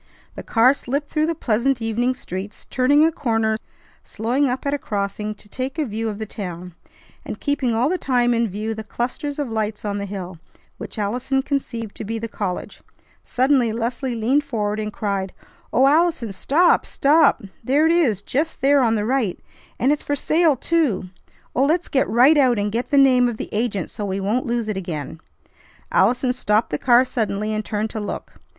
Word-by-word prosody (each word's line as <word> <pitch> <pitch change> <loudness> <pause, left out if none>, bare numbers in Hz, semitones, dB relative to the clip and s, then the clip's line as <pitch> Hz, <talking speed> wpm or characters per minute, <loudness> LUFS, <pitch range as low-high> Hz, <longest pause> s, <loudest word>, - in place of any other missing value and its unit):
The - - -7
car 245 +3 +4
slipped 285 +2 -3
through 310 0 +1
the 335 - -1
pleasant 245 -1 0
evening 240 +3 0
streets, 190 -3 -7
turning 285 +4 +3
a 325 - +3
corner, 225 -7 0 0.5
slowing 250 +6 0
up 255 +3 -3
at 280 - 0
a 290 - -1
crossing 210 0 -3
to 210 - -13
take 260 +7 -4
a 310 - 0
view 225 -1 -3
of 210 - -5
the 220 - -4
town, 180 -4 -7 0.5
and - - -7
keeping 280 -5 0
all 240 +4 +2
the 365 +3 -1
time 245 -2 +2
in 230 0 +1
view 215 +4 -3
the 220 0 -6
clusters 250 +7 -4
of 285 -6 -3
lights 215 -1 -2
on 205 0 -2
the 200 - -3
hill, 185 -3 -7 0.4
which - - -7
Allison 250 +6 -1
conceived 235 -7 -3
to - - -5
be 225 +2 -3
the 225 +1 -4
college. 200 -4 -5 0.4
Suddenly 255 -2 +2
Leslie 240 +2 -2
leaned 250 +6 +2
forward, 210 -5 -2
and 215 0 -3
cried: 200 -3 -3 0.4
"O 260 - +4
Allison, 300 - +2
stop! 335 - +3
Stop! 300 -1 +3 0.2
There 280 +6 +3
it 325 - +4
is, 255 - +2
just 310 +5 -2
there 280 +1 +4
on 225 -3 +2
the 210 -1 -1
right. 240 -6 0 0.4
And 260 +4 +2
it's 295 - 0
for 290 - -1
sale, 315 +1 +2
too! 255 - 0 0.5
Oh, 265 - +3
let's 340 +3 0
get 265 -8 +1
right 255 +8 +5
out 255 -4 +4
and 205 0 -1
get 235 +3 -2
the 285 - +2
name 255 -3 +5
of 230 - -5
the - - -6
agent, 210 -5 -2
so 210 - -5
we 195 0 -2
won't 215 +7 -1
lose 235 -2 -1
it 215 -3 -2
again." 160 -5 -5 0.7
Allison 250 0 +3
stopped 215 -3 +1
the 150 - -1
car 245 0 +5
suddenly, 215 -4 -2
and 215 0 -2
turned 215 0 -2
to 220 - -4
look. 205 - -6
235 Hz, 195 wpm, -22 LUFS, 210-275 Hz, 0.7 s, right